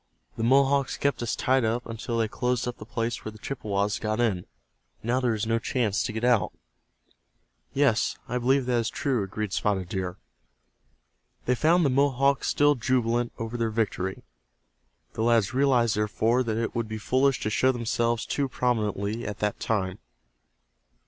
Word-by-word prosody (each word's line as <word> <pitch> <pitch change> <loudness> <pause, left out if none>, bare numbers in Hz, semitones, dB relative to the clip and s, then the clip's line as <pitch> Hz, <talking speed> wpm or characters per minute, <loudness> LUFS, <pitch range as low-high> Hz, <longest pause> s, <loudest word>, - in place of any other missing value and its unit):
"The - - -5
Mohawks 135 +2 +3
kept 140 -2 0
us 120 - -1
tied 130 0 +2
up 115 +2 0
until 115 +1 -4
they 115 -1 +2
closed 125 +2 -1
up 125 - -5
the 110 - -10
place 115 0 -3
where 110 - -5
the 110 - -13
Chippewas 105 -4 -2
got 110 +1 -2
in. 105 -7 0 0.6
Now 120 +3 +1
there 120 -3 +1
is 110 +1 -2
no 115 +1 +1
chance 115 -4 0
to 120 - -2
get 110 +1 -4
out." 120 -3 +3 1.2
"Yes, 135 -5 +2
I 125 - -1
believe 130 +2 +2
that 125 -1 +1
is 115 0 -1
true," 135 -6 -1
agreed 100 +1 -4
Spotted 95 -4 0
Deer. 90 -1 -3 1.3
They 125 - +3
found 165 +6 +3
the 140 - +3
Mohawks 135 0 +2
still 145 0 +4
jubilant 120 -2 0
over 115 +1 -4
their 115 -1 0
victory. 105 -4 -2 0.9
The - - -4
lads 115 -2 +3
realized, 125 -4 +3
therefore, 110 +3 +1
that 110 -1 -1
it 115 0 -2
would 115 -1 -2
be 110 0 -5
foolish 130 +4 +2
to 110 - -1
show 130 +4 +3
themselves 115 -1 0
too 140 -2 -1
prominently 110 -3 -1
at 105 - -4
that 105 0 -1
time. 95 -4 -1
115 Hz, 170 wpm, -26 LUFS, 110-125 Hz, 1.3 s, still